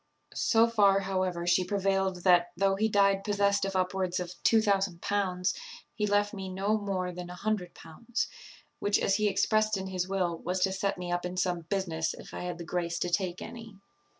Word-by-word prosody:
So 225 -1 +4
far, 200 -4 +4
however, 185 -3 -1
she 175 +1 +3
prevailed, 195 -1 0
that, 175 -2 +4
though 195 0 +3
he 220 +3 +1
died 200 -1 +3
possessed 200 -1 +2
of 195 -1 -4
upwards 185 0 0
of 180 0 -5
L2000, 195 -3 +1 0.4
he 210 -1 -1
left 205 +1 +2
me 190 -2 -5
no 195 +3 0
more 190 -3 -2
than 180 0 -7
L100, 180 +3 -3 0.5
which, 205 0 +2
as 195 - +2
he 215 -1 +2
expressed 215 +2 +2
in 190 - -4
his 185 -1 -2
will, 180 -4 -1
was 180 +2 -2
to 190 - +3
set 195 +1 -1
me 180 -1 -5
up 175 0 -1
in 180 +1 -4
some 175 -3 -1
business, 165 -5 -1
if - - -12
I - - -5
had 180 -1 -4
the 170 - -7
grace 170 0 -2
to 175 - -2
take 180 -1 0
to - - -7
any. 225 -3 -10
190 Hz, 190 wpm, -29 LUFS, 180-200 Hz, 0.5 s, So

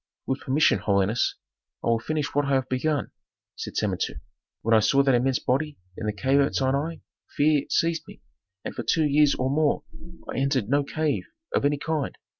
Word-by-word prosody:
"With 130 - -1
permission, 135 -5 +3
holiness, 100 +2 +1 0.5
I - - 0
will 115 -1 +3
finish 150 +4 -2
what 145 0 +2
I 140 -1 +2
have 130 -1 0
begun," 145 +3 -1 0.4
said - - -7
Samentu. - - -1 0.4
"When 115 - +2
I 110 - +7
saw 135 +6 +3
that 135 -1 +3
immense 125 +1 +2
body 145 +3 -1 0.2
in 110 - -5
the - - +1
cave 135 +7 +1
at 140 0 +2
Sinai 140 +5 0 0.4
fear 145 -1 +3
seized 165 -1 0
me, - - -14 0.4
and - - -4
for - - -4
two 160 -2 +2
years 150 0 +4
or 130 +1 -1
more 150 0 +1 0.4
I - - -3
entered 135 -5 0
no 145 +1 +3
cave 155 +1 -1 0.3
of - - +1
any 145 0 +2
kind. 155 -1 -2
140 Hz, 190 wpm, -25 LUFS, 130-150 Hz, 0.5 s, I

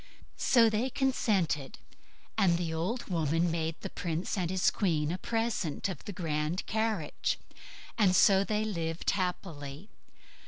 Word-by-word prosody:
So 235 -3 +5
they 220 +4 +1
consented, 205 - 0 0.6
and 175 -3 +3
the 170 -2 -2
old 190 +10 -2
woman 165 -1 +1
made 160 -1 -1
the - - -4
prince 170 +1 -2
and 180 -4 -1
his 185 0 +2
queen 160 -6 0
a 180 - -3
present 225 -10 -1
of 175 -7 -7
the - - -4
grand 160 -1 -2
carriage, 220 -8 -1 0.6
and 190 -4 +5
so 195 +1 +6
they 215 +1 0
lived 165 -5 -1
happily. 180 -3 -4
180 Hz, 135 wpm, -30 LUFS, 160-210 Hz, 0.6 s, so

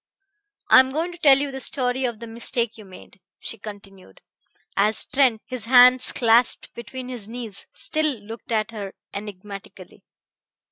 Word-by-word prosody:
"I - - +10
am 260 0 +4
going 320 +6 -2
to 345 - -12
tell 280 -5 +6
you 280 0 -1
the 265 - -6
story 255 -1 0
of 235 -3 -3
the 230 - -8
mistake 230 0 -2
you 215 - -12
made," 190 +1 -15 0.2
she 225 - -7
continued, 195 - -12 0.6
as 210 +2 +2
Trent, 255 -5 +1
his 255 -4 -6
hands 250 +1 +6
clasped 235 0 +3
between 250 +2 -8
his 240 -5 -7
knees, 225 -3 -8
still 310 -6 -1
looked 225 +3 -11
at 220 0 0
her 200 -4 -7 0.2
enigmatically. 200 -1 -9
235 Hz, 155 wpm, -23 LUFS, 210-255 Hz, 0.6 s, I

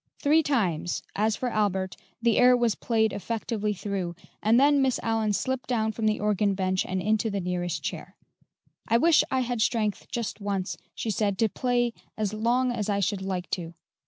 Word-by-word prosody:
Three 305 +2 +4
times, 190 - 0
as 215 +1 +1
for 250 - -2
Albert, 190 -4 0 0.3
the 235 -2 +3
air 250 0 +6
was 235 -3 +2
played 220 -2 +1
effectively 215 0 -2
through, 190 -3 -3 0.3
and 225 +3 +4
then 285 0 +5
Miss 265 -2 +1
Allyn 225 -2 +1
slipped 260 +5 -2
down 220 -3 +1
from 220 0 -1
the 215 - +1
organ 210 -1 +1
bench 185 -1 0
and 185 0 -1
into 215 +3 +1
the 200 -1 -2
nearest 175 -2 -2
chair. - - -5 0.7
"I 230 - +4
wish 325 +5 +5
I 260 -1 +1
had 245 -2 -2
strength 215 -2 0
just 230 -2 -4
once," 200 -1 -2 0.2
she 225 - -2
said, 200 -1 0
"to 225 +1 +2
play 240 0 0 0.2
as 215 -2 -1
long 240 +4 +1
as 215 -4 -2
I 200 -1 +1
should 200 0 0
like 185 -2 -3
to." 170 -2 -3
215 Hz, 190 wpm, -27 LUFS, 195-240 Hz, 0.7 s, air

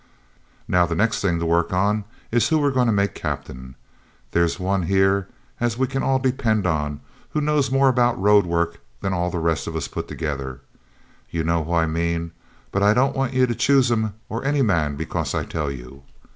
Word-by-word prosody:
'Now, 90 -1 +3
the 85 - -2
next 110 +6 +1
thing 85 -4 +1
to 85 - -2
work 85 +1 +2 0.6
is 120 0 +3
who 160 - +3
we're 145 -2 +2
to 125 -3 +2
make 100 -1 +1
captain 65 0 -6
of. - - -35
There's 85 +1 +1
one 95 +1 0
here 95 0 +2 0.3
as 120 -1 0
we 130 - +2
can 135 +1 -2
all 135 0 +2
depend 120 -6 0
on, 75 -4 -1 0.3
who 150 - +1
knows 150 -2 +1
more 135 +1 +3
about 120 -3 +2
road 100 -1 +4
work 85 0 -1 0.2
than 95 - -1
all 90 -1 0
the 90 - -3
rest 80 -1 0
of 80 - -5
us 80 - -2
put - - -5
together. 70 -5 -4 0.7
You 85 -1 -2
know 85 0 +1
who 85 +3 -4
I 85 -1 +3
mean; 85 +1 -1 0.4
but 100 - 0
I 105 +1 +5
don't 130 +3 +2
want 135 -1 -1
ye 130 0 +5
to 120 - -1
choose 135 0 +3
him 110 -3 0
or 115 +3 -4
any 140 0 +2
man 80 - +1
because - - -3
I - - -1
tell 75 -3 -3
you. 65 +1 -9
95 Hz, 205 wpm, -22 LUFS, 80-120 Hz, 0.7 s, I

